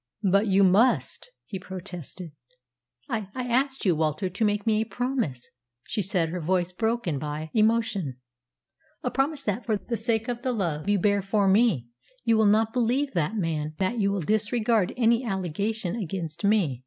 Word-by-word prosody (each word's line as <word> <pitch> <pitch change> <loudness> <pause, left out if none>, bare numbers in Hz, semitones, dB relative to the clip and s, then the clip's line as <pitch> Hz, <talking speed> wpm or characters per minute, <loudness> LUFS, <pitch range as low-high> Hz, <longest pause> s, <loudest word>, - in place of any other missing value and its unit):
"But 200 +2 +3
you 195 0 +4
must," 215 - +3 0.2
he 190 - -6
protested. 180 -2 -8 0.8
"I 220 -7 -3
I 255 - -2
asked 265 +2 0
you, 180 -4 +4
Walter, 155 +4 0
to 200 +5 -2
make 205 -1 +1
me 220 -1 +2
a - - +2
promise," 235 - -3 0.3
she 210 - -2
said, 180 -3 +1
her 180 +2 -3
voice 175 +2 0
broken 220 - -1
by 150 +2 -5
emotion 215 - +1 0.9
"a 250 - -1
promise 280 +1 0
that, 220 0 -1
for 220 -3 0
the 230 +3 -4
sake 225 0 0
of 240 -1 -3
the 255 0 -1
love 175 -5 -2
you 205 - +4
bear 200 +1 +2
for 195 +1 +1
me, 195 - +3 0.4
you 230 -1 +3
will 220 -1 +4
not 220 +2 +3
believe 255 +4 +1
that 170 +3 0
man, 155 -4 -2
that 195 +5 0
you 200 -1 +2
will 200 -2 -1
disregard 215 +2 +1
any 235 0 +3
allegation 195 0 -2
against 170 -6 -5
me." 200 - +2
205 Hz, 175 wpm, -26 LUFS, 180-230 Hz, 0.9 s, you